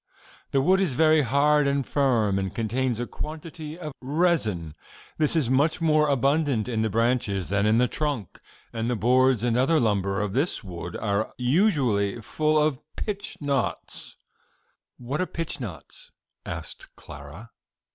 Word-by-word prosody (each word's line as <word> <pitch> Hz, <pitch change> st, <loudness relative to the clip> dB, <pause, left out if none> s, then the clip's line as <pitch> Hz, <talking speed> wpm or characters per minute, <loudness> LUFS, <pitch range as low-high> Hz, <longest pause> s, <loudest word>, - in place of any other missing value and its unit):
The 135 Hz, -1 st, +1 dB
wood 190 Hz, +5 st, +4 dB
is 175 Hz, -9 st, +1 dB
very 155 Hz, +2 st, +4 dB
hard 145 Hz, +3 st, +3 dB
and 140 Hz, -1 st, 0 dB
firm, 115 Hz, -8 st, +1 dB
and 95 Hz, 0 st, -4 dB
contains 120 Hz, +2 st, -1 dB
a 120 Hz, -, -1 dB
quantity 155 Hz, +2 st, -7 dB
of 155 Hz, -5 st, -7 dB
resin. 130 Hz, -, 0 dB, 0.5 s
This 155 Hz, +1 st, +2 dB
is 155 Hz, -7 st, +2 dB
much 140 Hz, +7 st, +2 dB
more 155 Hz, -2 st, +3 dB
abundant 140 Hz, -3 st, +1 dB
in 115 Hz, -3 st, -1 dB
the 110 Hz, -, +1 dB
branches 115 Hz, -4 st, 0 dB
than 100 Hz, +1 st, +1 dB
in 110 Hz, +1 st, +4 dB
the 125 Hz, +1 st, +3 dB
trunk, 140 Hz, -, -3 dB, 0.3 s
and 115 Hz, 0 st, -2 dB
the 125 Hz, -, 0 dB
boards 125 Hz, +2 st, +3 dB
and 120 Hz, -2 st, +1 dB
other 135 Hz, +6 st, +3 dB
lumber 100 Hz, -4 st, 0 dB
of 105 Hz, -2 st, -2 dB
this 140 Hz, +4 st, 0 dB
wood 90 Hz, -2 st, -7 dB
are 105 Hz, 0 st, -1 dB
usually 125 Hz, -, +1 dB
full 155 Hz, +7 st, +1 dB
of 150 Hz, -3 st, +1 dB, 0.2 s
pitch 200 Hz, -2 st, -5 dB
knots." 140 Hz, -3 st, -3 dB, 0.8 s
"What 130 Hz, +6 st, -3 dB
are 185 Hz, -, -1 dB
pitch 165 Hz, -3 st, -4 dB
knots?" 90 Hz, -, -8 dB, 0.4 s
asked -, -, -8 dB
Clara. 80 Hz, +12 st, -11 dB
130 Hz, 155 wpm, -25 LUFS, 110-150 Hz, 0.8 s, wood